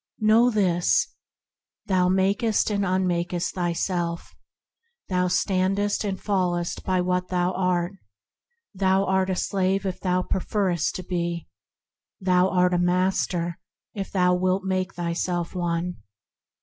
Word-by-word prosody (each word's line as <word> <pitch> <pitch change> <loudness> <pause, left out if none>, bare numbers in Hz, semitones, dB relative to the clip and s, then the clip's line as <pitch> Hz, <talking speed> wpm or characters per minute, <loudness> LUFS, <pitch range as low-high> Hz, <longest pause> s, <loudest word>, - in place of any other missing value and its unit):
Know 220 +3 +5
this: 175 - +2 0.7
Thou 180 -1 +2
makest 200 +4 +2
and 200 -1 0
unmakest 180 -2 0
thyself; 175 -1 -2 0.8
thou 180 -1 +1
standest 190 +3 +1
and 195 -2 -3
fallest 180 -4 -1
by 185 -1 +1
what 180 0 0
thou 180 0 0
art. 180 -1 0 0.8
Thou 190 0 +2
art 190 0 +1
a 185 - 0
slave 195 +1 0
if 185 -2 -3
thou 180 -1 0
preferrest 185 -3 -1
to 185 - -5
be; 170 -1 -3 0.7
thou 185 -1 +3
art 180 -1 +2
a 175 - +2
master 180 -1 0 0.3
if 195 -3 -4
thou 180 -2 +3
wilt 185 +1 +1
make 190 0 -2
thyself 175 0 -2
one. 175 -1 -2
185 Hz, 125 wpm, -25 LUFS, 175-190 Hz, 0.8 s, Know